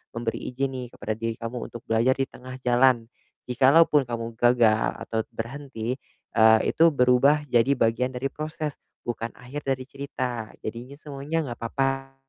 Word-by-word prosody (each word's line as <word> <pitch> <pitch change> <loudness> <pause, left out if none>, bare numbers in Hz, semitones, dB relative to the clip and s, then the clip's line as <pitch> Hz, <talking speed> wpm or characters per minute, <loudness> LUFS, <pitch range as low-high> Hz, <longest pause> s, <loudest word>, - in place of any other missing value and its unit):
memberi 115 -1 -2
izin 135 +1 0
nih 130 -1 -5
kepada 110 +2 -3
diri 115 0 -2
kamu 115 +1 -5
untuk 120 - -8
belajar 115 +4 +3
di 135 - 0
tengah 130 +1 -10
jalan. 125 -1 +4 0.4
Jikalau 135 +6 +6
pun 145 -4 +2
kamu 115 -1 -4
gagal 120 -3 +4
atau 110 - -2 0.2
berhenti, 125 0 -4 0.4
eee, 110 -1 +7
itu 165 - +3
berubah 125 +4 +4
jadi 120 +3 +4
bagian 125 +2 +1
dari 135 +2 -2
proses, 155 -1 -4 0.3
bukan 115 -1 -4
akhir 135 +3 -8
dari 130 -1 0
cerita. 130 -4 -5
Jadinya 120 +5 -6
semuanya 145 +2 -4
enggak 120 - -6
apa-apa 135 +3 -2
125 Hz, 155 wpm, -25 LUFS, 115-135 Hz, 0.4 s, eee